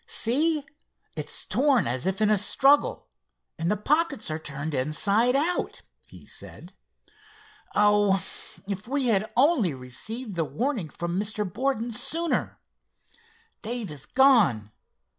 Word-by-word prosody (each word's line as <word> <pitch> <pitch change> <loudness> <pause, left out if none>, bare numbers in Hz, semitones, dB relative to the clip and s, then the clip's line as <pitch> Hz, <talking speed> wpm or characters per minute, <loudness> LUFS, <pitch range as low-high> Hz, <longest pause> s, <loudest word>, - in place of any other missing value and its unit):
"See, 295 +5 +1 0.5
it's - - -1
torn 270 -3 +2
as 125 +8 -2
if 190 +2 -1
in 215 0 +3
a 210 - +4
struggle, 275 +8 +3 0.5
and 165 +1 -1
the 210 - +1
pockets 285 - 0
are 155 - -3
turned 150 0 -5
inside 200 - +1
out," 325 +6 -1 0.2
he - - -15
said. - - -7 1.0
"Oh, 205 -1 +4 0.5
if 200 +1 -5
we 270 -1 0
had 215 0 +1
only 250 - +3
received 200 - -6
the 165 - 0
warning 230 - -2
from 175 +4 -3
Mr. 210 0 -2
Borden 240 +4 -2
sooner! 330 +8 -1 1.0
Dave 230 -4 -4
is 145 -3 -8
gone. 205 - +4
215 Hz, 125 wpm, -26 LUFS, 170-265 Hz, 1.0 s, a